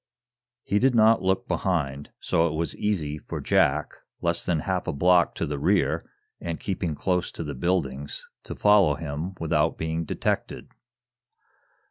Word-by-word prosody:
He 100 - +1
did 130 +1 +3
not 110 0 +5
look 95 0 0
behind, 70 -7 -1
so 80 +1 +2
it 80 - -3
was 80 +1 -2
easy 80 -8 -2
for - - -6
Jack, 75 +2 +2 0.3
less 85 0 0
than 85 -4 0
half 95 0 -2
a - - +1
block 90 +4 +3
to - - -2
the 75 -2 -4
rear, 90 +5 +2 0.4
and 85 -1 -4
keeping 90 -5 -2
close 90 +2 -1
to - - -5
the 75 -2 -5
buildings, 70 -2 -2 0.2
to - - -6
follow 100 -8 +4 0.4
without 80 -1 +1
being 80 +1 -2
detected. - - -3
85 Hz, 150 wpm, -26 LUFS, 75-95 Hz, 0.4 s, not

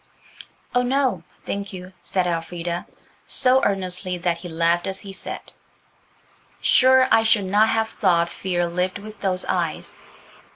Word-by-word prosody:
"Oh, 245 - +3
no, 255 - +1 0.2
thank 200 0 -4
you," 185 0 -9
said 185 -2 -1
Elfrida, 170 0 -3 0.4
so 260 +1 +3
earnestly 185 -2 0
that 175 -1 -1
he 175 +1 -8
laughed 170 +2 +1
as 190 0 -4
he 195 -1 -8
said– - - -7 1.1
"Sure 260 0 +5
I - - +6
should 220 -3 +3
not 205 +3 +3
have 225 0 +1
thought 170 -3 +2
fear 175 0 -2
lived 180 +2 -1
with 215 +1 -11
those 185 -2 +1
eyes." - - -2
185 Hz, 140 wpm, -23 LUFS, 175-215 Hz, 1.1 s, I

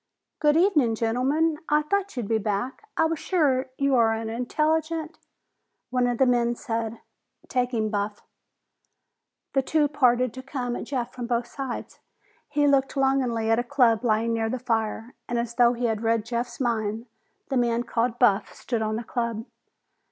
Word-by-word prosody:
"Good 300 0 +4
evening, 305 - +3
gentlemen! 270 +8 +1
I 300 0 +3
thought 400 +1 -1
you'd 235 -4 -2
be 225 0 +1
back! 220 - -3
I 325 - +4
was 320 -1 -1
sure 275 -8 +1
you 275 -1 +1
are 230 -3 +4
an 225 0 -4
intelligent 315 +6 -1 0.4
" - - -53
One 250 -1 +2
of 245 -1 -1
the 265 - +4
men 240 -1 +2
said, 230 -3 -4 0.5
"Take 250 -1 0
him, 220 -3 -1
Buff." 205 0 -3 1.3
The 270 - +3
two 300 +2 +2
parted 255 -4 +2
to 260 - -7
come 255 -2 -3
at - - -5
Jeff 250 -4 -3
from 245 -2 -5
both 235 0 0
sides. 265 0 -6 0.5
He 290 0 +2
looked 275 -1 +2
longingly 255 -5 +1
at 225 - +4
a - - 0
club 240 -2 +3
lying 230 0 +1
near 225 -1 0
the 255 - -2
fire, 225 -1 -2 0.2
and 240 - -1
as 235 0 -2
though 240 0 +4
he 245 0 -2
had 220 -2 0
read 225 -1 +1
Jeff's 235 +1 -3
mind, 225 -3 -1 0.4
the 270 - 0
man 240 -1 +1
called 235 0 -1
Buff 210 -5 +3
stood 235 -3 -3
on 215 0 -1
the 230 - -3
club. 235 -1 -3
245 Hz, 180 wpm, -25 LUFS, 225-270 Hz, 1.3 s, Good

